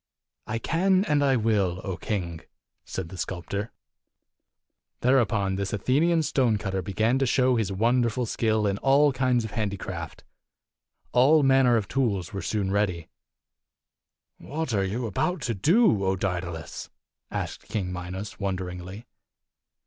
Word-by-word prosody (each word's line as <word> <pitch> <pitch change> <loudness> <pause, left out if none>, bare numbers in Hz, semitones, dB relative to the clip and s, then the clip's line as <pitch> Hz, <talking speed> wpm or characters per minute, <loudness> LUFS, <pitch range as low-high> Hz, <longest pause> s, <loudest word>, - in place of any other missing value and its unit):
"I 115 - -2
can 185 - +2
and 150 -4 +2
I 135 -2 +3
will, 105 -6 +1
O 95 - -3
king!" 85 -6 -4 0.4
said 90 -3 -5
the 95 - -9
sculptor. 95 +5 -4 1.3
Thereupon 110 -7 +2
this 100 0 -3
Athenian 155 - +2
stonecutter 110 -9 0
began 110 +7 +1
to 135 - +1
show 130 +1 +3
his 110 -4 0
wonderful 120 +4 +1
skill 110 -1 0
in 100 0 0
all 140 +1 +4
kinds 125 -2 +1
of 110 - -7
handi 100 -3 -2
craft. - - -7 0.9
All 145 +5 +5
manner 130 -3 +5
of 105 - -2
tools 105 -10 -1
were 95 - -3
soon 95 +3 -1
ready. 95 -5 -1 1.3
"What 155 -3 -4
are 100 -2 +2
you 110 +6 -2
about 150 - -1
to 120 - 0
do, 150 - +3
O 95 0 +1
Daedalus?" 85 -5 -4 0.4
asked - - -5
King 95 -5 -2
Minos, 90 +3 -6
wonderingly. 95 +1 -4
110 Hz, 135 wpm, -26 LUFS, 95-130 Hz, 1.3 s, All